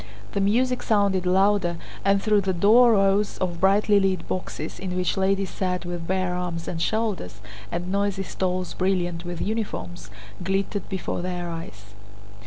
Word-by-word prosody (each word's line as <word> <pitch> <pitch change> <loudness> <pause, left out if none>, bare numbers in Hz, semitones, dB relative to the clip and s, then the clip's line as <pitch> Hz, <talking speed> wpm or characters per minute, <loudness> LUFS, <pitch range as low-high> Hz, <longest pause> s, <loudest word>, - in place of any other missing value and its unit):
The 200 - -1
music 250 +5 +2
sounded 200 -4 +2
louder 190 -2 +3 0.3
and 195 0 +3
through 210 -2 +3
the 190 -1 0
door 225 +7 +6
rows 200 0 +2
of 175 -2 -2
brightly 200 +2 +4
lit 190 -3 0
boxes 165 -4 -4
in 185 -1 -4
which 180 -1 0
ladies 195 0 +1
sat 180 -2 -2
with 175 -1 -5
bare 185 -1 0
arms 175 -2 -3
and 165 -2 -3
shoulders, 215 - -1 0.3
and 175 +2 -3
noisy 200 -1 0
stalls 185 -1 -2
brilliant 175 -2 -1
with 175 -1 -5
uniforms, 95 - -4 0.3
glittered 195 +2 -1
before 190 -2 -3
their 175 -1 -3
eyes. 105 -11 -9
190 Hz, 155 wpm, -25 LUFS, 175-200 Hz, 0.3 s, door